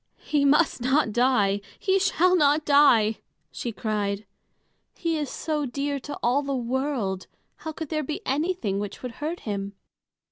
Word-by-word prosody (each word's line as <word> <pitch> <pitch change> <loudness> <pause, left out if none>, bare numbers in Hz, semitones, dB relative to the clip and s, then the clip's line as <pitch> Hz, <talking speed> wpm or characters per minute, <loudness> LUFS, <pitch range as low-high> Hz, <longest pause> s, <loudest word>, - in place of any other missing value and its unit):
"He 290 -2 +1
must 295 -1 +3
not 265 -1 +2
die! 215 -5 +2 0.2
He 385 0 +2
shall 365 -1 +3
not 300 -2 +3
die!" 240 -7 +5 0.3
she 240 - -4
cried. 210 -2 -2 0.7
"He 335 -2 -1
is 295 -3 -2
so 300 -3 -2
dear 280 +3 -2
to 290 +3 -7
all 250 +4 +3
the 280 -1 -2
world, 245 -6 -2 0.3
how 315 - -6
could 315 -1 -6
there 310 -1 -1
be 305 +1 -4
anything 275 - -1
which 205 +4 -6
would 250 - -4
hurt 320 +4 -3
him?" 200 -2 -4
275 Hz, 155 wpm, -25 LUFS, 220-300 Hz, 0.7 s, die